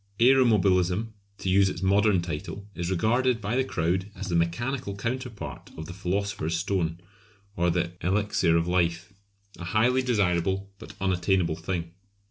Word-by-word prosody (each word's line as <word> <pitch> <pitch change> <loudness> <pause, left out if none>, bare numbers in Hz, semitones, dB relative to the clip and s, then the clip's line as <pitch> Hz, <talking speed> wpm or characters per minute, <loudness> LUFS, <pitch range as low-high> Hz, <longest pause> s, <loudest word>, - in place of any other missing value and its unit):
Aeromobilism 110 -6 +4 0.3
to - - -6
use 95 +1 +4
its 90 0 -5
most 95 - +2
modern 100 -3 +3
title 90 +4 -6
is 85 -2 -3
regarded 115 +6 +2
by 105 +2 -2
the 130 - +3
crowd 95 -3 -1
as 95 0 -6
the 85 - 0
mechanical 100 +7 -1
counterpart 115 - -5
of 80 - -6
the 90 - -8
Philosopher's 95 -3 -2
Stone 85 -3 -1 0.6
or 90 0 +2
the 85 0 0
Elixir 95 -3 +2
of 85 +1 0
Life; 90 +1 0 0.5
a - - -6
highly 115 +8 +2
desirable 95 -5 0
but - - -11
unattainable 95 -2 +1
thing. 85 0 -4
95 Hz, 150 wpm, -27 LUFS, 85-105 Hz, 0.6 s, Aeromobilism